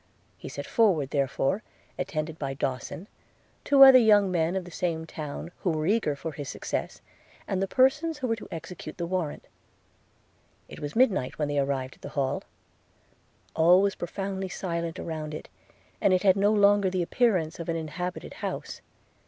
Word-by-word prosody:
He -, -, -9 dB
set -, -, -6 dB
forward, 175 Hz, -, +2 dB
therefore, 140 Hz, +6 st, 0 dB, 0.3 s
attended 160 Hz, -3 st, -4 dB
by 135 Hz, -2 st, -3 dB
Dawson, 140 Hz, +7 st, -4 dB, 0.6 s
two 280 Hz, -1 st, +7 dB
other 265 Hz, -1 st, +10 dB
young 205 Hz, -4 st, +5 dB
men 170 Hz, 0 st, +1 dB
of 190 Hz, -2 st, -2 dB
the 175 Hz, -, -11 dB
same 165 Hz, -2 st, -2 dB
town, 155 Hz, +1 st, -7 dB
who 185 Hz, -, -1 dB
were 155 Hz, -2 st, -1 dB
eager 200 Hz, -6 st, +1 dB
for 160 Hz, +3 st, -5 dB
his 145 Hz, -2 st, -7 dB
success, -, -, -4 dB, 0.5 s
and 190 Hz, -1 st, -1 dB
the 195 Hz, -, 0 dB
persons 290 Hz, -, +2 dB
who 265 Hz, -, -3 dB
were 225 Hz, -, +1 dB
to -, -, -10 dB
execute 165 Hz, -1 st, -8 dB
the 170 Hz, -, -2 dB
warrant. 175 Hz, -4 st, -3 dB, 1.2 s
It -, -, -11 dB
was 145 Hz, 0 st, -6 dB
midnight 215 Hz, -, +2 dB
when 150 Hz, -2 st, -1 dB
they 145 Hz, 0 st, 0 dB
arrived 135 Hz, -2 st, -2 dB
at -, -, -33 dB
the -, -, -7 dB
Hall 135 Hz, 0 st, 0 dB, 0.6 s
– -, -, -37 dB
All 175 Hz, +3 st, +6 dB
was 200 Hz, -1 st, +2 dB
profoundly 190 Hz, +2 st, -4 dB
silent 170 Hz, -3 st, -3 dB
around 155 Hz, -2 st, -5 dB
it, -, -, -9 dB, 0.5 s
and 195 Hz, -, +4 dB
it 185 Hz, -, 0 dB
had 190 Hz, -2 st, +5 dB
no 200 Hz, +1 st, +3 dB
longer 205 Hz, -2 st, +4 dB
the 185 Hz, -1 st, 0 dB
appearance 180 Hz, -7 st, +1 dB
of 170 Hz, -, -5 dB
an 165 Hz, -, 0 dB
inhabited 170 Hz, +3 st, -5 dB
house. -, -, -5 dB
175 Hz, 175 wpm, -27 LUFS, 155-200 Hz, 1.2 s, other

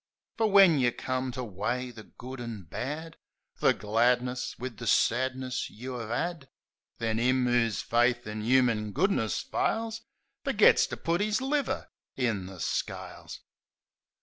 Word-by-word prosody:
Fer 225 Hz, -1 st, +2 dB
when 195 Hz, -7 st, +7 dB
yeh've 120 Hz, -2 st, +1 dB
come 130 Hz, 0 st, -2 dB
to 130 Hz, 0 st, -5 dB
weigh 120 Hz, +4 st, -3 dB
the 110 Hz, -2 st, -11 dB
good 125 Hz, +3 st, -9 dB
an' 115 Hz, -5 st, -6 dB
bad 145 Hz, -, -5 dB, 0.2 s
— -, -, -40 dB
The -, -, +5 dB
gladness 125 Hz, +4 st, 0 dB
wiv 125 Hz, -2 st, -6 dB
the 115 Hz, -, -6 dB
sadness 130 Hz, +3 st, +1 dB
you 125 Hz, +4 st, -7 dB
'ave 115 Hz, -2 st, -5 dB
'ad 160 Hz, +2 st, -2 dB, 0.2 s
— -, -, -50 dB
Then 115 Hz, -1 st, -1 dB
'im 130 Hz, +1 st, +2 dB
'oo's 120 Hz, -3 st, +1 dB
faith 120 Hz, +1 st, +2 dB
in 105 Hz, 0 st, -5 dB
'uman 115 Hz, -3 st, +2 dB
goodness 145 Hz, -, +1 dB
fails 225 Hz, 0 st, -1 dB, 0.4 s
Fergits -, -, +5 dB
to -, -, -6 dB
put 170 Hz, +3 st, 0 dB
'is 215 Hz, +1 st, +1 dB
liver 275 Hz, +1 st, -1 dB, 0.2 s
in 110 Hz, -8 st, -1 dB
the 95 Hz, -1 st, -10 dB
scales. -, -, -4 dB
125 Hz, 150 wpm, -29 LUFS, 115-135 Hz, 0.4 s, when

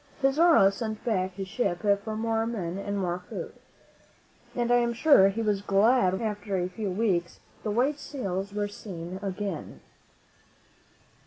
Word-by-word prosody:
Pizarro 275 Hz, -, +5 dB
sent 220 Hz, +2 st, -5 dB
back 190 Hz, -5 st, 0 dB
his 195 Hz, -1 st, -5 dB
ship 190 Hz, -4 st, -2 dB, 0.2 s
for 220 Hz, -1 st, -4 dB
more 225 Hz, 0 st, 0 dB
men 190 Hz, -6 st, -3 dB
and 200 Hz, 0 st, -3 dB
more 180 Hz, -2 st, -1 dB
food, -, -, -6 dB, 1.0 s
and 240 Hz, -1 st, 0 dB
I 245 Hz, -, +6 dB
am 235 Hz, -1 st, +1 dB
sure 235 Hz, -7 st, +6 dB
he 225 Hz, +3 st, -2 dB
was 205 Hz, -2 st, +1 dB
glad 200 Hz, 0 st, +3 dB
when, 190 Hz, -, -2 dB
after 205 Hz, -2 st, -2 dB
a 180 Hz, 0 st, 0 dB
few 200 Hz, +2 st, -4 dB
weeks, 180 Hz, -3 st, 0 dB, 0.2 s
the 215 Hz, -, -3 dB
white 260 Hz, +7 st, +1 dB
sails 195 Hz, -10 st, -4 dB
were 205 Hz, 0 st, -1 dB
seen 185 Hz, -3 st, -7 dB
again. 195 Hz, -3 st, -5 dB
205 Hz, 155 wpm, -27 LUFS, 190-230 Hz, 1.0 s, I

